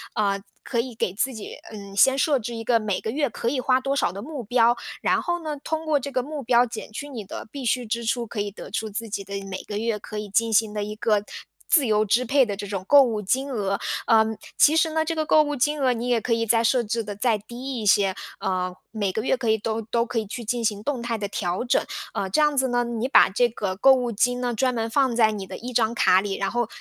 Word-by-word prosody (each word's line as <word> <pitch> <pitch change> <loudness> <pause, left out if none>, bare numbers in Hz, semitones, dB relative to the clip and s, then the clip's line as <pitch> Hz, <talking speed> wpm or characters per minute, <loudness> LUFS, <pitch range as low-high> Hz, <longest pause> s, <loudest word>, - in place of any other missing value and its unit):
呃， 200 -2 0 0.2
可 235 -2 0
以 250 -1 -7
给 185 - -1
自 255 +6 -1
己， 220 -3 -8 0.2
嗯， 200 -2 -9
先 265 +6 +5
设 280 0 +3
置 240 +1 -5
一 225 - -5
个 235 0 +4
每 210 -3 -1
个 220 - -4
月 285 0 0
可 230 - -5
以 255 +1 0
花 255 0 +3
多 275 +1 -1
少 275 - +1
的 195 - -7
目 275 0 -6
标， 240 +1 +3 0.3
然 - - +2
后 345 0 -2
呢， 310 -2 -4
通 320 0 -3
过 310 -2 +2
这 280 0 -5
个 255 - 0
目 290 +1 -6
标 245 0 +4
减 225 -2 -8
去 250 +7 -6
你 245 -7 -7
的 195 - -8
必 275 +1 -7
需 245 +1 +1
支 235 +1 -2
出， 235 0 -1
可 210 -1 -3
以 205 0 -3
得 200 - -10
出 220 +2 -3
自 225 +3 -5
己 200 -1 -3
的 200 +1 -5
每 190 -1 -6
个 205 - -5
月 225 0 -1
可 210 +1 -8
以 210 - -4
进 225 +3 +1
行 215 0 +3
的 210 - -2
一 210 +1 -5
个 210 -2 +1 0.5
自 295 -7 +5
由 215 0 +3
支 230 +4 +2
配 270 +2 +4
的 200 -3 -4
这 205 0 -5
种 195 -2 -4
购 285 +7 +7
物 230 -5 +1
金 265 +8 -1
额。 200 -4 -1 0.3
呃， 220 -1 +5 0.3
其 300 - +6
实 320 0 +3
呢， 315 0 0
这 330 - -2
个 315 -1 -1
购 310 - +5
物 295 -1 -1
金 295 +4 0
额 255 -2 +3
你 240 +1 -3
也 240 -2 +3
可 230 +1 -1
以 230 0 0
再 230 +1 +3
设 240 +1 +2
置 230 +1 -2
得 210 -2 -6
再 220 +1 +1
低 245 +4 -6
一 - - -5
些， 200 -1 +4 0.3
呃， 185 -1 -1 0.2
每 205 -4 -1
个 220 - -1
月 255 +2 +1
可 235 -4 -2
以 220 - +4
都 220 +1 -3
都 235 +2 0
可 230 - -2
以 220 - -3
去 235 +3 -6
进 235 +1 -2
行 210 -1 -1
动 270 -1 -2
态 235 -1 -2
的 200 -1 -4
调 180 0 -2
整。 245 - +2 0.3
呃， 195 -1 -2
这 205 - +2
样 295 -1 +2
子 265 0 +3
呢， 245 0 +1
你 235 0 -2
把 275 - +6
这 240 +6 +2
个 200 -5 -4
购 270 +6 +7
物 250 -2 0
金 245 +4 +1
呢， 245 -1 -1
专 250 +3 +1
门 225 0 -2
放 260 0 +2
在 220 -2 +4
你 200 -3 -6
的 - - -7
一 245 +2 -7
张 230 -1 +1
卡 185 -5 +5
里， 195 -1 -3
然 195 - -1
后 240 -2 0
230 Hz, 300 characters per minute, -24 LUFS, 210-255 Hz, 0.5 s, 购